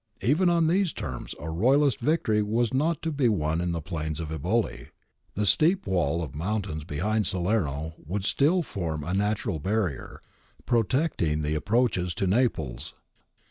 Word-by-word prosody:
If 105 - -1
even 175 +4 +3
on 170 -1 +3
these 180 +2 +2
terms 70 - -6
a 75 - -6
Royalist 130 - +3
victory 125 -9 +1
was 115 +3 0
not 155 +4 0
to 165 - -1
be 140 -5 +2
won 80 -5 0
in 90 0 -1
the 85 -2 -3
plains 80 -2 -4
of 80 -2 -4
Eboli, 80 - -1 0.5
the 105 - 0
steep 170 - +3
wall 85 -3 0
of 70 - -7
mountains 90 -1 -3
behind 105 +8 0
Salerno 85 -6 -1
would 95 +5 -3
still 165 +10 +2
form 80 - -4
a 85 +5 -3
natural 105 -2 0
barrier, 95 -4 -2 0.4
protecting 115 - +1
the 75 +1 -1
approaches 95 0 +1
to 95 - -1
Naples. 80 - 0
100 Hz, 160 wpm, -27 LUFS, 80-120 Hz, 0.5 s, even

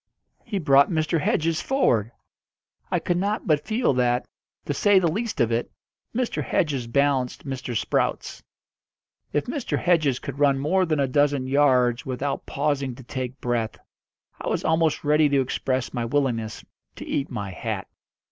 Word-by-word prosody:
He 220 -4 -3
brought 140 -5 +5
Mr. 160 -1 0
Hedges 160 +2 +1
forward. 120 - +1 0.8
I - - +1
could 175 - -1
not 205 +4 -1
but 150 -2 +1
feel 220 - +2
that, 125 -1 +1 0.4
to 145 - -1
say 205 +6 +4
the 185 -2 +4
least 225 +5 -3
of 120 0 +2
it, 115 +1 -1 0.5
Mr. 250 0 -1
Hedges 140 -7 0
balanced 135 0 0
Mr. 130 -3 -3
Sprouts. - - -1 0.9
If 145 - 0
Mr. 270 0 -2
Hedges 155 -7 +2
could 140 +1 -7
run 140 -2 +4
more 180 +7 +1
than 155 -2 0
a 140 - +3
dozen 145 0 +2
yards 130 -3 +3
without 135 +2 -3
pausing 140 -3 -1
to 130 - -12
take 130 +1 -5
breath, 120 -2 -1 0.6
I - - -6
was - - -1
almost 160 -1 +2
ready 150 0 +4
to 140 -1 +3
express 130 0 -1
my 120 -2 -2
willingness 115 -4 -1 0.3
to - - -8
eat 140 - -2
my 100 -6 -4
hat. 90 - -4
140 Hz, 160 wpm, -24 LUFS, 125-160 Hz, 0.9 s, brought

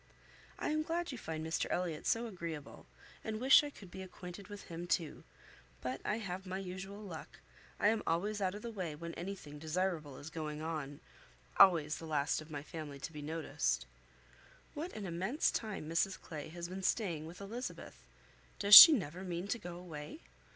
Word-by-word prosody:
I - - -2
am 310 0 +1
glad 335 +1 -2
you 255 - -6
find 160 -4 -5
Mr 160 - -1
Elliot 175 -4 -2
so 230 +1 +1
agreeable, 170 -8 -7 0.4
and 215 -1 -3
wish 265 +4 +7
I 295 - -4
could 195 -10 -14
be 190 - -7
acquainted 180 0 -9
with 205 -1 -9
him 170 +1 -7
too; 165 -4 -1 0.6
but 130 +1 -4
I 210 - 0
have 190 -3 -5
my 185 +1 -3
usual 195 +2 -7
luck: 175 -6 -9 0.4
I 205 - +4
am 220 0 +1
always 205 +5 0
out 185 0 0
of 210 - -8
the 235 - -5
way 180 -8 -4
when 170 +2 -7
any 195 +4 -5
thing 150 -5 -11
desirable 160 -3 -2
is 155 +3 -9
going 155 -2 -4
on; 155 -2 -5 0.6
always 165 -6 +6
the 165 - -8
last 150 0 0
of 155 - -12
my 145 -2 -5
family 150 -3 -7
to 165 - -6
be 150 - -7
noticed. 155 - -1 0.9
What 325 +5 -5
an 210 - -6
immense 190 - 0
time 210 -8 -4
Mrs 170 +4 0
Clay 150 -4 -7
has 170 +1 -6
been 185 +2 -6
staying 175 -6 -1
with 170 +2 -10
Elizabeth! 225 +6 -7 0.5
Does 205 0 +2
she 325 - +15
never 180 - -2
mean 175 0 -4
to 240 - -1
go 175 -4 -7
away? 155 -4 -8
175 Hz, 190 wpm, -34 LUFS, 155-200 Hz, 0.9 s, she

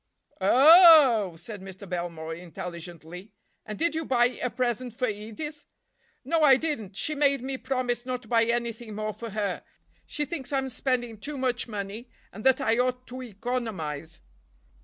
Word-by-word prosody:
"O—o—h!" 265 - +7
said 205 +3 -8
Mr. 190 +1 -10
Belmore 170 -3 -4
intelligently, 175 +2 -9 0.3
"and 210 -1 -5
did 335 0 +1
you 320 0 -2
buy 245 -4 +3
a 250 - 0
present 245 0 -2
for 255 - 0
Edith?" 225 +9 -6 0.6
"No, 325 +4 +1
I 275 -4 +7
didn't. 235 - -4
She 305 - -1
made 280 -3 +2
me 265 0 -3
promise 250 -2 -2
not 250 0 -4
to - - -16
buy 230 0 +3
anything 235 -2 -2
more 215 0 -3
for 230 +2 -7
her; 205 -3 -3 0.4
she 300 - -2
thinks 285 -5 -6
I'm 270 -1 0
spending 240 -3 -2
too 290 +6 -6
much 255 -2 -1
money, 210 +2 -6 0.2
and 215 - -9
that 265 -1 +5
I 225 +2 +1
ought 250 0 0
to 255 +1 -7
economize." 205 - -5
240 Hz, 160 wpm, -27 LUFS, 200-260 Hz, 0.6 s, O—o—h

